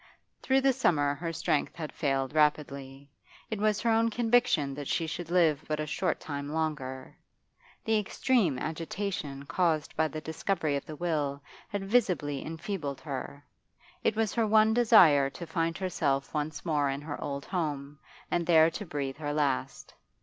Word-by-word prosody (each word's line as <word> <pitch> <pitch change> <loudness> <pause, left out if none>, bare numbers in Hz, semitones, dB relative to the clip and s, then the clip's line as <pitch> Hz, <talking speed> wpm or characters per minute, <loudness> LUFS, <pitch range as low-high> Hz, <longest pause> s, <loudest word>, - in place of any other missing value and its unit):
Through 270 0 +3
the 270 0 +4
summer 145 - +2
her 165 +3 -4
strength 160 -3 -1
had 155 -3 -5
failed 135 -2 -1
rapidly; 140 -2 0 0.4
it 215 - -2
was 215 0 +2
her 230 - +2
own 225 +1 +3
conviction 230 - +2
that 145 0 -6
she 165 - 0
could 165 +1 -5
live 165 -5 +3
but 155 0 -1
a 155 - -1
short 180 +5 -1
time 145 -1 -5
longer. 150 -5 -3 0.7
The 220 -1 +3
extreme 210 - +1
agitation 160 -2 -4
caused 160 -2 0
by 160 0 +2
the 155 +1 -6
discovery 160 -1 -1
of 140 - -4
the 155 - -6
will 145 -4 -2 0.2
had 205 -2 -4
visibly 180 - +1
enfeebled 160 -3 -5
her; 140 0 -6 0.6
it 220 - +2
was 220 -1 0
her 230 -2 +1
one 215 +1 +5
desire 180 - +6
to 170 - -8
find 165 -1 -1
herself 140 -7 -1
once 150 0 -3
more 145 -4 +1
in 135 +1 -3
her 145 -1 -6
old 140 -1 -4
home, 150 -5 -3 0.3
and 170 -1 0
there 160 -1 +6
to 205 - -6
breathe 140 -3 -3
her 145 -1 -3
last. 145 - -1
155 Hz, 165 wpm, -29 LUFS, 145-185 Hz, 0.7 s, desire